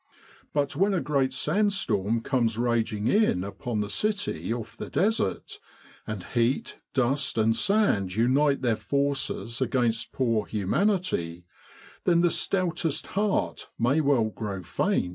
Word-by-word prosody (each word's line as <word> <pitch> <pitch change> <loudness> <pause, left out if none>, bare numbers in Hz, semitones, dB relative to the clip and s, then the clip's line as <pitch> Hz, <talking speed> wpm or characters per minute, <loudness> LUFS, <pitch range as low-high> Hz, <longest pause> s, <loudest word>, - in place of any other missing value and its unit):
But 145 -1 0
when 195 +5 +2
a - - +2
great 135 -2 +1
sand 195 +10 +1
storm 110 - 0
comes 115 -3 0
raging 115 -3 0
in 200 - +3
upon 105 +2 -3
the 105 - -3
city 200 - -1
off 115 -1 -4
the - - -7
Desert, 200 - -1 0.5
and 105 -4 -4
heat, 120 +2 -1 0.2
dust, 130 0 +1
and 110 0 +3
sand 195 - +2
unite 135 +5 +2
their 120 -3 +2
forces 140 -4 -2
against 120 -3 0
poor 115 -5 0
humanity 105 - 0 0.6
then 170 -1 +4
the 175 -1 +3
stoutest 170 -5 -1
heart 205 0 -1
may 130 +7 +2
well 135 -7 +2
grow 100 -5 -5
faint. 90 - 0
125 Hz, 135 wpm, -27 LUFS, 110-160 Hz, 0.6 s, then